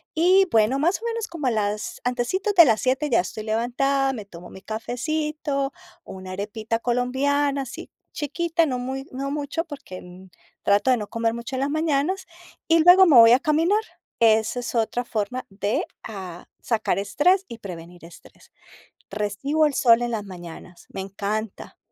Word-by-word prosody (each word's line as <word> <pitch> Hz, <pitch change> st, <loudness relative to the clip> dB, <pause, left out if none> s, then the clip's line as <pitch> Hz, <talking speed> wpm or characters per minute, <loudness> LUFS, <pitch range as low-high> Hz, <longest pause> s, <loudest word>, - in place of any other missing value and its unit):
Y, 370 Hz, +4 st, +4 dB
bueno, 225 Hz, +4 st, +3 dB
más 340 Hz, +6 st, +1 dB
o -, -, -7 dB
menos 460 Hz, -1 st, -2 dB
como 335 Hz, -8 st, -6 dB
a -, -, +2 dB
las 210 Hz, -1 st, -2 dB
antecitos 250 Hz, -, -1 dB
de 340 Hz, -3 st, +9 dB
las 225 Hz, -5 st, +2 dB
7 265 Hz, +4 st, 0 dB
ya 230 Hz, -, +4 dB
estoy 200 Hz, +4 st, -4 dB
levantada, 250 Hz, +5 st, 0 dB
me 215 Hz, -5 st, -7 dB
tomo 175 Hz, -2 st, -12 dB
mi 190 Hz, -, -12 dB
cafecito, 275 Hz, +4 st, -3 dB, 0.3 s
una 185 Hz, -1 st, -9 dB
arepita 215 Hz, +4 st, -3 dB
colombiana, 275 Hz, +4 st, 0 dB
así 245 Hz, -, -9 dB, 0.2 s
chiquita, 330 Hz, +3 st, 0 dB
no 255 Hz, -4 st, -2 dB
muy 265 Hz, +2 st, -5 dB
no 275 Hz, +2 st, -4 dB
mucho, 295 Hz, +3 st, -3 dB
porque, 285 Hz, -, -9 dB
mm, 180 Hz, +1 st, -14 dB, 0.3 s
trato 205 Hz, +5 st, +3 dB
de 250 Hz, -, +3 dB
no 210 Hz, -2 st, -5 dB
comer 230 Hz, +1 st, -1 dB
mucho 235 Hz, +3 st, -6 dB
en 260 Hz, -, -2 dB
las 275 Hz, -, 0 dB
mañanas, 315 Hz, +4 st, 0 dB, 0.4 s
y 330 Hz, 0 st, +4 dB
luego 360 Hz, +2 st, +8 dB
me 320 Hz, -6 st, +5 dB
voy 230 Hz, 0 st, +9 dB
a 250 Hz, -, +5 dB
caminar. 330 Hz, +7 st, +2 dB, 0.4 s
Esa 220 Hz, +1 st, +3 dB
es 245 Hz, -, -5 dB
otra 230 Hz, +2 st, 0 dB
forma 230 Hz, +3 st, -3 dB
de, 200 Hz, +2 st, -2 dB, 0.2 s
ah, 185 Hz, -5 st, -8 dB, 0.2 s
sacar 220 Hz, -4 st, 0 dB
estrés 355 Hz, -, +2 dB
y 235 Hz, -, -9 dB
prevenir 175 Hz, -3 st, -10 dB
estrés. 170 Hz, -, -17 dB, 0.6 s
Recibo 215 Hz, +10 st, 0 dB
el 295 Hz, -, 0 dB
sol 235 Hz, -2 st, +4 dB
en 240 Hz, -, -1 dB
las 220 Hz, -3 st, -3 dB
mañanas, 175 Hz, -2 st, -11 dB
me -, -, -6 dB
encanta. 200 Hz, +2 st, -5 dB
245 Hz, 170 wpm, -23 LUFS, 210-295 Hz, 0.6 s, de